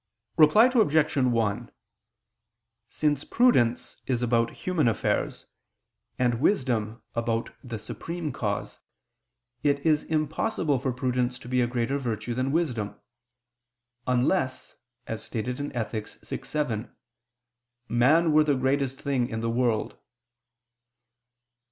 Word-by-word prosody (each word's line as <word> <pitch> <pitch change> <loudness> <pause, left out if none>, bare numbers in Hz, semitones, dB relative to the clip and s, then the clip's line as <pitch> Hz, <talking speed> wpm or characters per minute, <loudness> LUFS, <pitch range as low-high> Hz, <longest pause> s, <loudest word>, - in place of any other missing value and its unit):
Reply 160 +8 +7
Obj. 205 - +3
1: 115 -6 +1 1.2
Since 145 -2 0
prudence 125 - +2
is 125 -2 0
about 115 -1 +2
human 175 -8 -1
affairs, 115 - -1 0.7
and 120 -1 +1
wisdom 115 - 0
about 115 -1 -1
the 120 -3 -5
Supreme 165 +8 -5
Cause, 105 -4 -3 0.8
it 140 -1 +2
is 155 -2 +3
impossible 155 - 0
for 130 +1 -1
prudence 125 0 -1
to - - -13
be 125 0 +1
a 120 - +2
greater 125 +3 -1
virtue 120 -2 -3
than 130 +3 -1
wisdom, 125 -11 -1 1.1
"unless," 130 +3 0 0.3
as 110 - -5
stated 125 +3 -4
in 145 - -3
Ethic. 110 -2 -3 0.2
vi, - - -5
7, 125 -7 -3 0.9
"man 150 +8 +4
were 155 0 +6
the 145 -2 +2
greatest 135 0 0
thing 130 -4 0
in 110 -2 -3
the 115 0 -1
world." 115 -2 0
125 Hz, 115 wpm, -27 LUFS, 115-150 Hz, 1.2 s, Reply